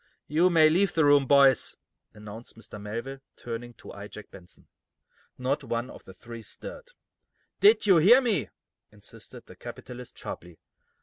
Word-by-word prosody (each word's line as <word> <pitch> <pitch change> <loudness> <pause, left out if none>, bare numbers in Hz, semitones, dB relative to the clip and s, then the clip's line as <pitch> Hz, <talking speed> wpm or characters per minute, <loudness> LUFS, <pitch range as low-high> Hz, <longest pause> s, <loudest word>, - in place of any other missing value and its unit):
"You 165 +5 +3
may 160 -3 +6
leave 180 +5 +2
the 160 -2 +3
room, 145 -2 +5
boys," 140 -2 +4 0.4
announced 105 +2 -11
Mr. 105 -2 -11
Melville, 115 +6 -6 0.2
turning 120 0 -7
to - - -12
eye 100 +1 -9
Jack 105 -1 -12
Benson. 90 -2 -15 0.7
Not 135 +3 -1
one 120 0 -3
of - - -14
the 95 - -12
three 115 +4 -10
stirred. 480 - -10 0.7
"Did 420 - +5
you 190 -4 +6
hear 210 +11 +7
me?" 225 - -1 0.4
insisted - - -14
the - - -14
capitalist, 125 0 -10
sharply. 85 -1 -8
130 Hz, 150 wpm, -27 LUFS, 115-160 Hz, 0.7 s, hear